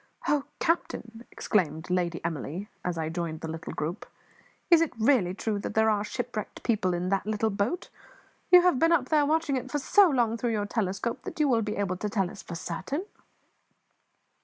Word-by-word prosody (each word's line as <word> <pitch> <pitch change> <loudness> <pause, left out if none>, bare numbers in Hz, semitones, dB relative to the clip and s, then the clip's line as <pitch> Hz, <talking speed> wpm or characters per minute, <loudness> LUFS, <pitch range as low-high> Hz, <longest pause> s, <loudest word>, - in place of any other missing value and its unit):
"Oh, 290 -2 +2
captain," 235 -8 -2
exclaimed 165 -5 -1
Lady 175 -2 -1
Emily, 165 +4 -4 0.2
as 180 -1 -2
I 160 -1 -1
joined 165 -1 -4
the 160 - -4
little 160 +1 -6
group, 165 +6 -4 0.6
"is 335 -1 +8
it 330 - +1
really 220 -6 +3
true 210 0 -2
that - - -5
there 220 0 +4
are 205 -1 +1
shipwrecked 230 -1 -5
people 200 -6 +1
in 180 +1 -2
that 195 +1 0
little 215 0 0
boat? 205 - -2 0.6
You 360 -1 +8
have 360 -8 +3
been 330 +1 +4
up 280 -7 +2
there 300 -2 +3
watching 315 -3 +1
it 255 +1 -5
for 295 - -1
so 370 +7 +5
long 235 -5 +1
through 235 0 -1
your 205 -1 0
telescope 205 +2 -2
that - - -8
you 300 - +4
will 235 -4 +3
be 210 -1 -2
able 190 -2 -1
to 210 +3 -3
tell 195 -4 0
us 195 - -10
for 170 - -8
certain." 190 - -4
215 Hz, 195 wpm, -28 LUFS, 180-265 Hz, 0.6 s, is